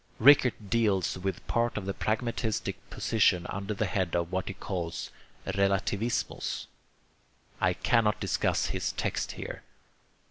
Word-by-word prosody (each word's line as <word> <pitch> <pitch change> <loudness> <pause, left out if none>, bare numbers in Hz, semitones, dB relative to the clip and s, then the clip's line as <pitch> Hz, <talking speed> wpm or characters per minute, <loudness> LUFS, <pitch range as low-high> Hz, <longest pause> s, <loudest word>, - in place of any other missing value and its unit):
Rickert 125 -6 +5
deals 105 -6 +2
with 95 +1 -3
part 120 -1 0
of 100 - -3
the 100 - -1
pragmatistic 110 0 -1
position 90 -1 +2
under 100 +1 -3
the 110 - 0
head 95 -2 -1
of 85 0 0
what 95 0 -1
he 100 - -4
calls 85 -4 -4 0.3
'Relativismus.' 100 +3 0 1.0
I - - +4
cannot 110 -3 +2
discuss - - +1
his - - -1
text - - -2
here. - - -6
100 Hz, 130 wpm, -29 LUFS, 95-110 Hz, 1.0 s, Rickert